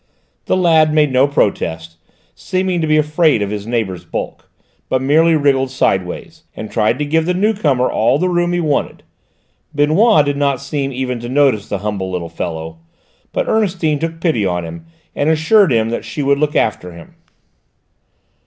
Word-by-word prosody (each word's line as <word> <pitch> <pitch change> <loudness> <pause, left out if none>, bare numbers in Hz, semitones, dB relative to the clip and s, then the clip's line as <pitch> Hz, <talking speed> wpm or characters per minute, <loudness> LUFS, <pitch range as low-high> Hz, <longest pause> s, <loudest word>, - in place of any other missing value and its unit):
The - - +1
lad 160 -4 +4
made 150 -2 +3
no 130 +2 +3
protest, 85 - -2 0.4
seeming 185 -2 -2
to 160 - -1
be 155 0 +3
afraid 150 -5 +2
of 100 - -4
his 105 0 -5
neighbour's 110 -7 -2
bulk, - - -6 0.4
but 130 - +1
merely 160 +5 +3
wriggled 135 -3 +1
sideways 95 -8 -2
and 110 - -7
tried 110 +3 +1
to 150 - -2
give 160 +2 0
the 180 - 0
new 210 +4 +2
comer 140 - +1
all 115 +5 +1
the 185 - 0
room 175 -1 0
he 175 - 0
wanted. 150 -4 -2 0.7
Benoît 155 +3 +4
did 145 0 -1
not 140 -2 0
seem 140 0 -3
even 125 -1 -3
to 120 +1 -7
notice 130 -6 +1
the 100 - -2
humble 100 -3 -3
little 90 -2 -4
fellow, 80 -1 -6 0.5
but - - -2
Ernestine 180 -8 0
took 165 +1 -4
pity 160 - 0
on 90 -3 -1
him 80 0 -10 0.3
and 145 - 0
assured 160 +3 +3
him 115 -1 +1
that 120 - -3
she 145 - -5
would 140 0 +2
look 150 0 0
after 90 -5 -1
him. 85 -1 -14
140 Hz, 180 wpm, -17 LUFS, 105-160 Hz, 0.7 s, lad